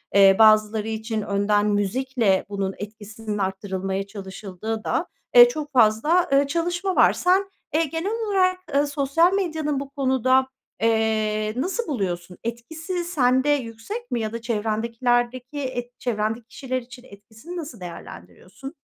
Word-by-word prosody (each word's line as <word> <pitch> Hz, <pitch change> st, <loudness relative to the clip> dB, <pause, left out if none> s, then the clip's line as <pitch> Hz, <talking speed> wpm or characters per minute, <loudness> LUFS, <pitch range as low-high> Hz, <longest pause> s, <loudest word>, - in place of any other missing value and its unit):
eee, 195 Hz, -1 st, +7 dB
bazıları 215 Hz, 0 st, +5 dB
için 220 Hz, 0 st, -3 dB
önden 205 Hz, +1 st, +1 dB
müzikle 205 Hz, 0 st, +1 dB
bunun 195 Hz, -1 st, -2 dB
etkisinin 215 Hz, +1 st, -7 dB
arttırılmaya 190 Hz, 0 st, -3 dB
çalışıldığı 200 Hz, +2 st, -6 dB
da, -, -, 0 dB, 0.3 s
eee, 485 Hz, 0 st, +10 dB
çok 300 Hz, -10 st, -6 dB
fazla, 250 Hz, +9 st, +3 dB
eee, 275 Hz, +1 st, +4 dB
çalışma 350 Hz, +4 st, -1 dB
var. -, -, +5 dB
Sen, 380 Hz, +2 st, +2 dB, 0.2 s
eee, 320 Hz, +2 st, +3 dB
genel 325 Hz, +7 st, -3 dB, 0.2 s
olarak, 370 Hz, -2 st, +2 dB
eee, 285 Hz, +1 st, +3 dB
sosyal 290 Hz, +5 st, +2 dB
medyanın 315 Hz, -7 st, -1 dB
bu 275 Hz, 0 st, -6 dB
konuda, 260 Hz, -2 st, +2 dB, 0.3 s
eee, 215 Hz, -1 st, +1 dB
nasıl 375 Hz, -, -2 dB
buluyorsun? 180 Hz, -, -3 dB
Etkisi 320 Hz, +10 st, -4 dB
sende 265 Hz, -5 st, +2 dB
yüksek 290 Hz, -, -3 dB
mi 240 Hz, -, 0 dB
ya 220 Hz, 0 st, -3 dB
da 230 Hz, -, -5 dB
çevrendekilerdeki 235 Hz, +4 st, -1 dB
et 245 Hz, -3 st, -5 dB
çevrendeki 220 Hz, -1 st, -2 dB
kişiler 255 Hz, 0 st, -4 dB
için 250 Hz, +1 st, -13 dB
etkisini 220 Hz, -, -11 dB
nasıl 290 Hz, -, -7 dB
değerlendiriyorsun? 180 Hz, -, -10 dB
235 Hz, 135 wpm, -23 LUFS, 210-290 Hz, 0.3 s, eee